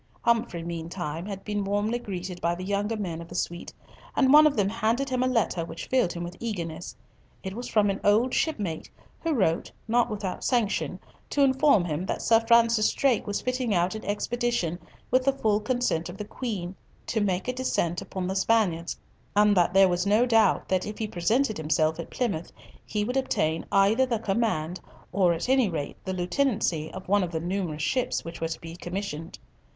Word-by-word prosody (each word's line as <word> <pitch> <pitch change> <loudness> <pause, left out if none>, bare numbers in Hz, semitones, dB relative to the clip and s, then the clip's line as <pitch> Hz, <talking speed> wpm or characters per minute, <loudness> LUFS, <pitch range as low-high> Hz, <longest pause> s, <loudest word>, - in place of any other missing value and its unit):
Humfrey 230 -7 +1
meantime 170 0 -5
had 195 -2 -6
been 205 -1 -1
warmly 205 +4 0
greeted 180 -5 -6
by 170 0 +1
the 180 - -7
younger 205 +3 -1
men 170 -5 -4
of 170 - -9
the 175 - -10
suite, 175 -1 -3 0.4
and 265 -1 +4
one 305 +1 +9
of 295 - 0
them 205 -3 +2
handed 230 +5 0
him 255 -1 +1
a 255 - +2
letter 230 -8 +1
which 165 0 -7
filled 255 -9 +2
him 170 - -5
with 175 +1 -6
eagerness. 170 - -5 0.5
It 190 - -4
was 240 +4 -6
from 210 -2 +3
an 195 - -4
old 220 +5 +3
shipmate, 200 - -1 0.3
who 330 - -1
wrote, 170 -7 +1 0.2
not 235 +2 +2
without 200 -3 -4
sanction, 235 -5 0 0.3
to 285 - +2
inform 265 -7 +4
him 170 +3 -3
that - - -2
Sir 225 -1 +5
Francis 230 -1 +4
Drake 265 -6 +1
was 205 - -2
fitting 250 -4 -1
out 175 +3 +1
an 215 - -6
expedition, 210 -5 -1 0.3
with 255 +1 +4
the 275 +1 +3
full 215 -6 +1
consent 215 -8 -1
of 175 - -8
the 210 - -5
Queen, 205 -6 -4 0.3
to 220 - -1
make 190 -1 0
a 250 - 0
descent 180 -9 -1
upon 185 -1 -5
the 190 +1 -2
Spaniards, 190 -5 +1 0.4
and 210 0 +5
that 175 -2 +3
there 195 0 +7
was 180 +1 0
no 215 +4 +4
doubt 225 -5 +3
that 185 -1 +1
if 210 - -6
he 220 - -2
presented 215 +7 +1
himself 155 +1 +1
at 170 - -6
Plymouth, 200 -10 -2 0.3
he 210 -1 -2
would 250 +4 -1
obtain 165 -11 0
either 205 +6 +4
the 235 -2 0
command, 195 -6 -1 0.3
or 180 -1 +3
at 170 +5 -2
any 260 -4 +3
rate 150 -4 -4
the 190 - -3
lieutenancy, 180 - 0
of 190 0 -9
one 205 +2 +3
of 180 - -1
the 160 - -2
numerous 170 -3 -3
ships 255 - 0
which 165 0 -8
were 165 - 0
to 160 - -5
be 165 0 -8
commissioned. 175 -2 -5
200 Hz, 200 wpm, -27 LUFS, 175-235 Hz, 0.5 s, one